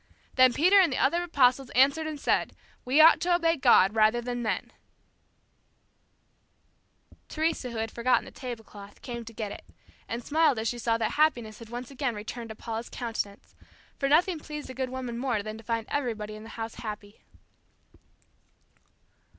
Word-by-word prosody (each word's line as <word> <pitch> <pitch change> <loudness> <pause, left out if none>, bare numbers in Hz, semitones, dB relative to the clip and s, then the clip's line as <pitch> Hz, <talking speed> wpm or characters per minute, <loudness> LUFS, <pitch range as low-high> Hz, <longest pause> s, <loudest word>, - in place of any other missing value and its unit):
Then 255 -1 +6
Peter 365 +10 +5
and 360 -6 +4
the - - -1
other 340 +6 +2
apostles 270 -6 +2
answered 280 +5 +4
and 305 -2 -5
said, - - 0 0.3
We 260 +5 +2
ought 320 +2 +8
to 350 0 +3
obey 335 -1 +2
God 210 - +5
rather 220 +2 +3
than 245 0 -4
men.'" 220 - -3 2.6
Teresa, 315 -5 -1
who 235 - -7
had 225 0 -3
forgotten 245 +2 +1
the - - -11
tablecloth, 225 -5 -9
came 235 -2 -6
to 230 - -9
get 215 -2 -5
it, - - -9 0.4
and 235 +1 -4
smiled 305 -3 +3
as 220 +1 -2
she 240 +2 -2
saw 230 0 +1
that 225 -2 -1
happiness 240 -8 +1
had 230 -2 -11
again 250 +1 -4
returned 225 +2 -7
to 220 - -7
Paula's 225 +1 -6
countenance; 225 -4 -5 0.5
for 275 - 0
nothing 335 +3 +3
pleased 300 -1 -7
the 260 - -8
good 260 0 -3
woman 250 -2 -5
more 240 -5 -1
than 215 +1 -7
to - - -13
find 230 0 -2
everybody 225 -7 -3
in 215 - -9
the 225 - -11
house 225 0 -5
happy. 210 -2 -8
245 Hz, 170 wpm, -28 LUFS, 225-285 Hz, 2.6 s, ought